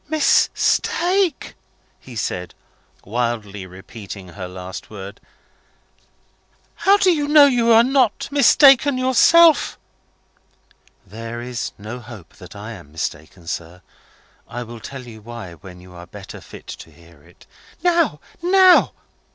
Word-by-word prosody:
"Mistake?" 345 Hz, +3 st, +1 dB, 0.5 s
he 125 Hz, -, -13 dB
said, 90 Hz, -4 st, -4 dB, 0.5 s
wildly 105 Hz, -3 st, -3 dB
repeating 95 Hz, 0 st, -11 dB
her 90 Hz, 0 st, -8 dB
last 90 Hz, 0 st, -9 dB
word. 100 Hz, -2 st, -10 dB, 1.5 s
"How 395 Hz, +1 st, +3 dB
do 380 Hz, -2 st, +3 dB
I 295 Hz, -4 st, -1 dB
know 295 Hz, -1 st, +7 dB
you 240 Hz, -4 st, +2 dB
are 225 Hz, +1 st, +7 dB
not 255 Hz, -3 st, +1 dB
mistaken 280 Hz, -1 st, +5 dB
yourself?" 305 Hz, +6 st, +4 dB, 1.3 s
"There 115 Hz, +3 st, -8 dB
is 120 Hz, -1 st, -5 dB
no 110 Hz, +4 st, -8 dB
hope 115 Hz, -7 st, -13 dB
that -, -, -13 dB
I -, -, -8 dB
am 70 Hz, -, -12 dB
mistaken, 80 Hz, +2 st, -6 dB
sir. 85 Hz, +2 st, -7 dB, 0.6 s
I 120 Hz, +1 st, -6 dB
will 120 Hz, 0 st, -10 dB
tell 130 Hz, +3 st, -9 dB
you 110 Hz, -2 st, -12 dB
why, 115 Hz, -5 st, -9 dB
when 90 Hz, +1 st, -13 dB
you 90 Hz, 0 st, -15 dB
are 85 Hz, 0 st, -12 dB
better 95 Hz, +1 st, -11 dB
fit -, -, -13 dB
to -, -, -10 dB
hear 85 Hz, -1 st, -20 dB
it." -, -, -21 dB, 0.4 s
"Now! 340 Hz, -, +2 dB, 0.2 s
now!" 370 Hz, +1 st, +5 dB
120 Hz, 125 wpm, -20 LUFS, -, 1.5 s, know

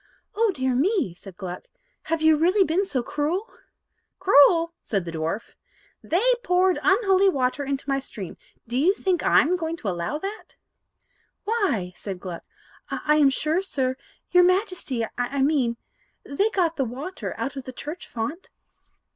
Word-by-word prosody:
"Oh 450 Hz, +2 st, +2 dB
dear 260 Hz, -6 st, -1 dB
me!" 320 Hz, -, +1 dB
said 185 Hz, +1 st, -13 dB
Gluck; 180 Hz, -3 st, -7 dB, 0.4 s
"have 325 Hz, 0 st, -1 dB
you 315 Hz, 0 st, +6 dB
really 360 Hz, +6 st, +4 dB
been 370 Hz, +3 st, +1 dB
so 260 Hz, -10 st, -2 dB
cruel?" 320 Hz, -, -2 dB, 0.7 s
"Cruel!" 335 Hz, 0 st, +5 dB
said 195 Hz, -5 st, -2 dB
the 170 Hz, -, -5 dB
dwarf, 165 Hz, +7 st, -3 dB, 0.5 s
"they 355 Hz, +6 st, 0 dB, 0.2 s
poured 365 Hz, -1 st, +3 dB
unholy 390 Hz, -3 st, +4 dB
water 265 Hz, -3 st, 0 dB
into 275 Hz, 0 st, -3 dB
my 275 Hz, -1 st, +1 dB
stream; 210 Hz, -8 st, -8 dB, 0.3 s
do 245 Hz, +2 st, -1 dB
you 365 Hz, +8 st, +4 dB
suppose 375 Hz, -4 st, 0 dB
I'm 340 Hz, +6 st, +4 dB
going 330 Hz, -1 st, -3 dB
to 215 Hz, -, -3 dB
allow 175 Hz, +9 st, -2 dB
that?" 395 Hz, +6 st, -7 dB, 0.9 s
"Why," 390 Hz, -, 0 dB
said 195 Hz, -3 st, -6 dB
Gluck, 180 Hz, -2 st, -6 dB, 0.5 s
"I 300 Hz, 0 st, +1 dB
am 290 Hz, -2 st, +6 dB
sure, 310 Hz, +6 st, 0 dB
sir 265 Hz, -9 st, -1 dB, 0.4 s
your 360 Hz, 0 st, +6 dB
Majesty, 365 Hz, -, +1 dB
I 265 Hz, +3 st, 0 dB
mean 265 Hz, -5 st, +1 dB, 0.5 s
they 395 Hz, +10 st, 0 dB
got 350 Hz, -6 st, 0 dB
the 275 Hz, -, +1 dB
water 275 Hz, +11 st, -6 dB
out 275 Hz, -, -3 dB
of 270 Hz, -2 st, -6 dB
the 255 Hz, -, -6 dB
church 300 Hz, +7 st, -7 dB
font." 270 Hz, +11 st, -5 dB
300 Hz, 155 wpm, -24 LUFS, 250-365 Hz, 0.9 s, you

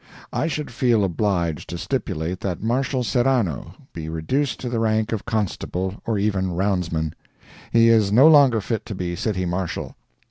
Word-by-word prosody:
I 160 Hz, -, 0 dB
should 150 Hz, -3 st, -3 dB
feel 120 Hz, -4 st, +2 dB
obliged 85 Hz, -4 st, -1 dB
to 85 Hz, -, -4 dB
stipulate 85 Hz, +1 st, -3 dB
that 95 Hz, -1 st, -4 dB
Marshal 125 Hz, +2 st, 0 dB
Serrano 120 Hz, -, 0 dB, 0.2 s
be 80 Hz, -2 st, -6 dB
reduced 115 Hz, -, -1 dB
to 125 Hz, -, -4 dB
the 120 Hz, -1 st, -1 dB
rank 110 Hz, 0 st, +1 dB
of 110 Hz, -3 st, -3 dB
constable, 100 Hz, -3 st, -2 dB
or 110 Hz, -2 st, +1 dB
even 95 Hz, -3 st, 0 dB
roundsman. 90 Hz, -5 st, -1 dB, 0.6 s
He 115 Hz, 0 st, +5 dB
is 110 Hz, -3 st, +4 dB
no 130 Hz, +8 st, +7 dB
longer 140 Hz, -8 st, +6 dB
fit 110 Hz, +1 st, -3 dB
to 105 Hz, -, -5 dB
be 90 Hz, -2 st, -3 dB
City 95 Hz, 0 st, -1 dB
Marshal. 90 Hz, 0 st, -3 dB
105 Hz, 165 wpm, -23 LUFS, 90-115 Hz, 0.6 s, no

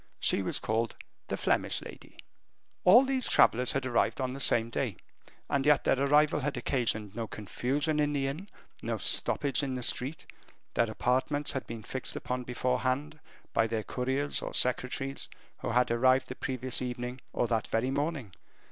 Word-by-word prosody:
She -, -, +3 dB
was 95 Hz, -, -1 dB
called 115 Hz, +1 st, -1 dB, 0.3 s
the -, -, -2 dB
Flemish -, -, +1 dB
lady. -, -, -12 dB, 0.7 s
All 230 Hz, +9 st, +8 dB
these 265 Hz, -2 st, 0 dB
travelers 125 Hz, +2 st, +4 dB
had 135 Hz, -1 st, -1 dB
arrived 120 Hz, +1 st, +1 dB
on 130 Hz, -1 st, -1 dB
the 135 Hz, -, -7 dB
same 115 Hz, -3 st, +3 dB
day, 115 Hz, -7 st, -2 dB, 0.5 s
and 140 Hz, -1 st, 0 dB
yet 150 Hz, 0 st, +4 dB
their 135 Hz, -, +2 dB
arrival 150 Hz, +2 st, +4 dB
had 145 Hz, -1 st, -2 dB
occasioned 115 Hz, -5 st, 0 dB
no 115 Hz, -1 st, -3 dB
confusion 135 Hz, +10 st, -1 dB
in 150 Hz, 0 st, +2 dB
the 140 Hz, -2 st, 0 dB
inn, 155 Hz, +9 st, -4 dB, 0.3 s
no -, -, -2 dB
stoppage 140 Hz, -2 st, +2 dB
in 135 Hz, -2 st, -2 dB
the 125 Hz, -, -4 dB
street; 135 Hz, +6 st, -2 dB, 0.5 s
their 115 Hz, -, +2 dB
apartments 130 Hz, +6 st, 0 dB
had 135 Hz, -, -4 dB
been 115 Hz, -1 st, -7 dB
fixed 130 Hz, +4 st, -4 dB
upon 125 Hz, 0 st, -3 dB
beforehand, 130 Hz, +5 st, -1 dB, 0.3 s
by 115 Hz, -, +3 dB
their 110 Hz, -1 st, -2 dB
couriers 130 Hz, +5 st, -2 dB
or -, -, -5 dB
secretaries, 130 Hz, +2 st, 0 dB, 0.3 s
who -, -, -4 dB
had 125 Hz, 0 st, +2 dB
arrived 130 Hz, +2 st, +3 dB
the 130 Hz, -, -5 dB
previous 130 Hz, -1 st, -2 dB
evening 125 Hz, 0 st, -4 dB
or -, -, 0 dB
that 115 Hz, -2 st, -1 dB
very 120 Hz, +4 st, 0 dB
morning. 140 Hz, -, -2 dB
130 Hz, 170 wpm, -30 LUFS, 120-140 Hz, 0.7 s, All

